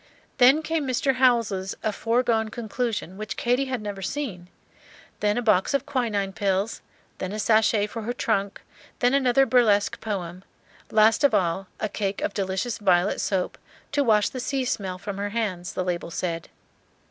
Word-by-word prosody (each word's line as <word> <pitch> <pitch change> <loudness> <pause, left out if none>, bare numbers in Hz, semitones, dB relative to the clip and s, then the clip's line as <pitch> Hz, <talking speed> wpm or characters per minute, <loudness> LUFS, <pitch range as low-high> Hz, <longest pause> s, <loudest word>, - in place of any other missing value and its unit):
Then 265 +5 +6
came 320 -3 -1
Mr. 260 +1 +1
Howells's 230 -7 +2
"A 215 - +1
Foregone 230 0 +1
Conclusion," 220 -4 -3
which 215 +1 -5
Katy 245 +3 +1
had 255 -4 -3
never 200 -2 -5
seen; 195 -6 -4 0.7
then 210 +1 +1
a 245 - -1
box 215 +4 +3
of 280 - 0
quinine 220 -8 -1
pills; 195 +2 -1 0.4
then 185 - -3
a 210 - -4
sachet 215 -1 +3
for 225 +2 -6
her 225 +3 -3
trunk; 200 -5 -1 0.4
then 245 +1 +2
another 270 -1 +4
burlesque 225 -5 +3
poem; 185 -4 -4 0.5
last 220 +5 +4
of 275 -6 +5
all, 190 0 0
a - - -1
cake 200 -1 -3
of - - -1
delicious 195 +4 -2
violet 190 -1 +2
soap, 190 -2 -1 0.3
"to 285 - +2
wash 215 -4 +3
the 255 - -6
sea 265 +1 -1
smell 190 -6 -2
from 200 +1 -6
her 205 0 -2
hands," 200 -5 -3
the 185 - -1
label 175 -2 -3
said. 170 -1 -3
215 Hz, 170 wpm, -25 LUFS, 195-245 Hz, 0.7 s, Then